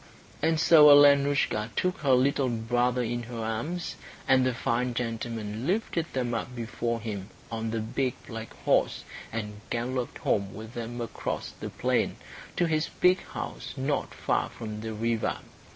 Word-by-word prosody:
And 160 +1 +2
so 155 -2 +8
Alenoushka 140 -6 +5
took 180 0 0
her 140 -3 +3
little 135 +1 +2
brother 120 +2 +1
in 120 +1 -2
her 120 0 -7
arms, 115 +11 -3 0.3
and 130 -1 +5
the 130 - +2
fine 120 0 -1
gentleman 115 -1 -3
lifted 175 -4 0
them 125 -2 -1
up 120 +2 -3
before 115 0 -2
him 105 -3 -5 0.2
on 115 0 -2
the 110 0 -1
big 125 +3 -1
black 115 -1 -7
horse, - - +2 0.3
and 105 -2 -5
galloped 125 +1 -2
home 100 -1 0
with 110 +2 -9
them 120 +1 -5
across 115 - -4
the - - -7
plain - - 0 0.4
to 175 - +2
his 155 -1 0
big 180 0 +5
house - - -6
not 135 +2 -1
far - - 0
from 110 -2 -7
the 110 0 -4
river. 115 +1 0
120 Hz, 155 wpm, -28 LUFS, 115-140 Hz, 0.4 s, so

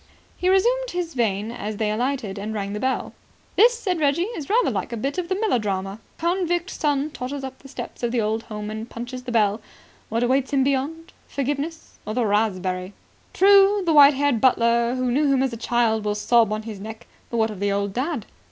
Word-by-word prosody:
He 365 - 0
resumed - - +2
this 350 -2 -3
vein 220 -3 0
as 215 -3 -5
they 210 -1 0
alighted 225 -3 -2
and 215 +2 -4
rang 200 -1 -3
the 210 - -3
bell. 260 +2 -1 0.4
"This," 475 +3 +5
said 370 -7 -2
Reggie, 295 +3 +2
"is 300 -6 -6
rather 475 +4 +3
like - - -3
a 235 - -3
bit 275 +9 -2
out 360 - -2
of 345 - -16
a 375 - 0
melodrama. 205 - -1 0.2
Convict 350 +1 0
son 290 0 0
totters 270 +1 -5
up 265 0 -7
the 275 - -13
steps 275 - -8
of 240 -1 -1
the 245 - 0
old 220 +1 0
home 210 -1 -6
and 220 +2 -6
punches 245 +2 -6
the 250 -1 -6
bell. 215 -2 +2 0.5
What 230 +2 0
awaits 260 +2 +1
him 270 -1 +3
beyond? 285 +5 -2
Forgiveness? 290 +4 -4
Or 215 - -5
the 245 -2 +1
raspberry? 190 -3 0 0.4
True, 395 +1 +5
the 330 - +2
white 290 -1 +8
haired 280 -5 +1
butler 235 -1 +3
who 255 -1 0
knew 285 +2 +2
him 265 -1 +3
as 265 -3 -1
a - - -3
child 230 -2 +1
will 210 0 -1
sob 225 +1 +3
on 215 0 -2
his 215 -3 -7
neck, 220 +3 -8 0.2
but 235 - -3
what 220 -1 +2
of 205 - -8
the 200 0 0
old 200 0 -1
dad? 260 -1 -2
250 Hz, 215 wpm, -23 LUFS, 215-300 Hz, 0.5 s, white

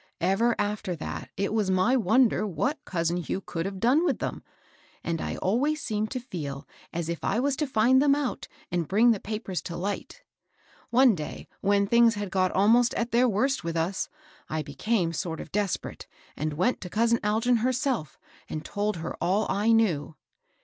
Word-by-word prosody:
Ever 195 +7 +2
after 205 -3 -2
that 155 - -6
it 200 +2 -1
was 215 -3 +1
my 190 +7 +3
wonder 225 0 +3
what 275 - -2
cousin 170 -1 -1
Hugh 175 +2 -3
could 170 -2 -4
have 195 -1 -6
done 255 - +3
with - - +1
them, - - -4 0.6
and 165 -1 -2
I - - -3
always 275 +11 +1
seemed 215 -5 -2
to 255 - -3
feel 150 - -6 0.2
as 170 -1 -3
if 170 0 -4
I 205 - +1
was 275 +2 +1
to 300 - 0
find 260 +2 +4
them 280 -1 +4
out 285 -3 -3 0.2
and 170 -3 -1
bring 225 +5 +5
the 215 - 0
papers 210 -4 -4
to 170 - -6
light. 205 - -4 0.7
One 250 0 +5
day 155 -5 -6
when 200 0 +2
things 235 +1 +4
had 205 -2 -4
got 185 0 +2
almost 230 +5 +4
at 235 0 -1
their 245 +2 +4
worst 260 +6 +1
with 165 0 -3
us, 175 +4 -1 0.4
I 155 0 -2
became 170 +5 -1
sort 165 0 -3
of - - -8
desperate, 205 -2 -2 0.3
and 155 +1 -2
went 185 +11 0
to 180 - -6
cousin 230 +3 +2
Algin 225 +3 +2
herself, 255 - -1 0.3
and 155 0 -5
told 205 -1 -2
her 165 0 -5
all 200 +4 +2
I 205 +4 +2
knew." 175 -10 +2
205 Hz, 185 wpm, -27 LUFS, 175-240 Hz, 0.7 s, bring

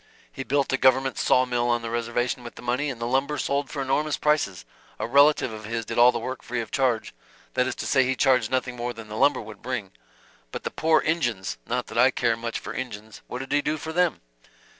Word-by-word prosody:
He - - -7
built 140 0 0
a - - +3
government 130 0 +3
saw 130 - +4
mill 120 -1 0
on 120 -1 +1
the 115 - -4
reservation 120 +1 -1
with 120 - -9
the - - -11
money, 125 +5 0
and 125 -4 -6
the 115 - -3
lumber 135 +4 0
sold 140 0 -1
for 140 +1 -3
enormous 150 +3 0
prices 150 - 0 0.3
a - - -2
relative 140 -1 +4
of 110 -1 -8
his 115 +1 -3
did - - -2
all 120 +1 +8
the 120 - -3
work 130 +2 -5
free 125 0 -4
of 115 -2 -5
charge 130 -4 0 0.4
that 125 0 +2
is - - -3
to - - -5
say 135 -2 +4
he 130 +1 0
charged 125 -4 +3
nothing 130 -1 -1
more 120 0 -3
than 115 -2 -10
the 105 - -6
lumber 145 - +3
would 105 -2 -11
bring." 120 -7 -4 0.6
"But - - -6
the - - -3
poor 160 0 +3
Injuns 120 - -1
not - - -1
that - - -4
I - - +7
care - - +1
much - - -4
for - - -7
Injuns 105 +1 -7
what 125 - -5
did 135 - -8
he 145 - +3
do 150 +2 -1
for 160 +1 -6
them?" 180 0 +1
125 Hz, 245 wpm, -25 LUFS, 115-140 Hz, 0.6 s, all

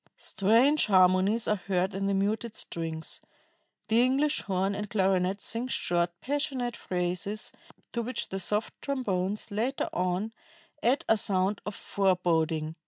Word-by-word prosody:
"Strange 235 +11 +3
harmonies 190 +3 +4
are 210 -3 +1
heard 190 0 +1
in 195 +1 -1
the 200 - +1
muted 210 +3 -1
strings. 160 -1 -4 0.7
The 225 +2 +4
English 275 +4 +2
horn 195 0 0
and 205 +1 -4
clarinet 195 -2 +1
sing 230 +3 -2
short, 175 -8 0
passionate 270 -4 -1
phrases, 180 +3 -3 0.4
to 235 - -1
which 250 +3 -3
the 195 - -3
soft 210 +4 0
trombones 210 -7 -1
later 235 +7 -1
on 180 +4 -1 0.5
add 255 +4 +2
a 225 - +4
sound 195 0 +1
of 205 - -4
foreboding. 165 -5 +1
200 Hz, 135 wpm, -29 LUFS, 185-230 Hz, 0.7 s, harmonies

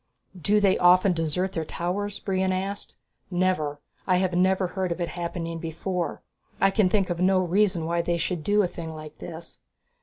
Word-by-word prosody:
"Do 205 +4 +2
they 200 -2 +3
often 180 +1 +5
desert 165 +3 0
their 165 - -1
towers?" 190 +6 -3
Brion 190 -1 0
asked. 195 +2 -4 0.3
"Never. 175 -6 0 0.3
I 185 -1 +4
have 185 -1 0
never 185 +1 +2
heard 185 -1 -2
of 170 - -2
it 175 - -1
happening 170 -1 -4
before. 170 +2 -3 0.4
I 195 - +4
can 195 -2 +3
think 195 -2 +1
of 170 - -2
no 185 +1 +4
reason 185 -1 +2
why 170 +1 +1
they 170 0 0
should 170 -1 -2
do 205 +3 +3
a - - +1
thing 165 -2 -7
like 155 -1 -10
this." 165 0 -8
180 Hz, 185 wpm, -26 LUFS, 170-190 Hz, 0.4 s, often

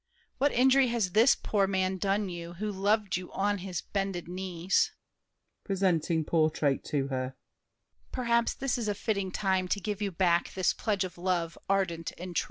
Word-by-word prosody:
What 285 +2 +3
injury 260 +2 +5
has 230 -6 0
this 225 +7 +6
poor 200 -2 0
man 190 -1 0
done 200 +2 0
you, 170 -1 -6
Who 210 +4 -3
loved 205 0 +1
you 180 0 -8
on 205 +1 0
his 185 -2 -4
bended 195 -4 -3
knees? 180 0 0 0.7
[Presenting 175 -5 +1
portrait 155 -4 +1
to 140 -2 -1
her. 130 -1 -3 0.8
Perhaps 235 -2 +1
This 260 -2 -1
is 225 - -2
a 205 - 0
fitting 200 -2 -1
time 190 -1 0
to 200 - 0
give 205 +1 -4
you 205 - 0
back 175 -1 +1
This 185 -1 +2
pledge 205 -3 -1
of 180 -2 -7
love 175 -2 -1
ardent 185 -4 0
and 180 0 -7
true. - - +4
190 Hz, 175 wpm, -29 LUFS, 175-205 Hz, 0.8 s, this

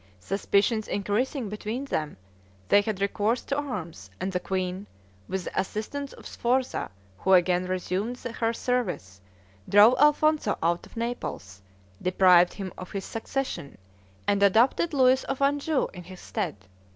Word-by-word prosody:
Suspicions 205 - +1
increasing 220 +5 -1
between 215 +6 -4
them, 155 - -3 0.5
they 205 - +6
had 210 -2 -3
recourse 205 +4 0
to 280 - -2
arms, 180 - -5
and 190 - -2
the 180 - -1
queen, 185 +1 -3 0.4
with 190 -1 -3
the - - -3
assistance 270 +8 -5
of - - -14
Sforza, 255 +2 -1 0.3
who 190 - +2
again 180 0 +4
resumed 185 +6 -2
her 230 -2 -2
service, 200 - -2 0.5
drove 210 +4 +8
Alfonzo 300 -4 +3
out 170 +1 0
of - - -16
Naples, 225 - -4 0.4
deprived 180 -1 +5
him 195 -2 -6
of 185 - -8
his 195 -1 -4
succession, 225 - -4 0.5
and 200 0 +2
adopted 230 - +4
Louis 260 -2 +4
of 270 - -3
Anjou 285 +1 +1
in 180 -1 -10
his 185 0 -11
stead. 200 -8 -3
205 Hz, 140 wpm, -27 LUFS, 185-250 Hz, 0.5 s, drove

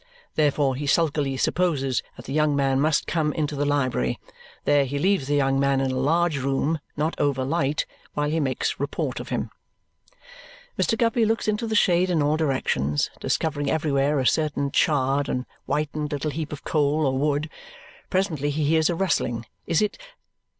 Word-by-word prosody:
Therefore 145 -3 +2
he 145 +2 -4
sulkily 145 -3 +1
supposes 135 -7 +1
that - - -12
the 135 - -5
young 150 -1 +2
man 135 -1 +2
must 155 0 +2
come 160 -3 0
up - - -4
into 150 -1 -1
the 145 +1 0
library. 130 - 0 0.5
There 145 -1 +4
he 140 +2 -3
leaves 185 -3 +1
the 145 - +1
young 135 -1 +2
man 140 -1 +2
in 135 -1 0
a - - -2
large 160 +2 +2
room, 140 +4 0 0.2
not 155 +3 0
over 140 -3 +1
light, 145 0 0 0.3
while 145 0 0
he 160 +2 0
makes 135 -4 -1
report - - -2
of - - -7
him. - - -2 1.2
Mr. 225 - +1
Guppy 230 +1 +2
looks 225 +1 0
into 215 +2 0
the 220 - -1
shade 180 -2 +3
in 165 -4 +2
all 150 +1 +2
directions, 130 - 0
discovering 145 -3 -1
everywhere 145 -2 +1
a 130 - 0
certain 145 -1 +1
charred 140 -1 +2
and 125 0 -2 0.2
whitened 150 0 -2
little 145 +1 -2
heap 155 +1 -4
of 150 - -7
coal 150 0 +1
or 135 -1 +1
wood. 145 +1 0 0.6
Presently 170 -7 0
he 150 +1 -1
hears 160 +2 +3
a 175 - 0
rustling. 130 -10 0 0.2
Is 165 +5 +2
it 210 - -2
145 Hz, 180 wpm, -24 LUFS, 135-160 Hz, 1.2 s, There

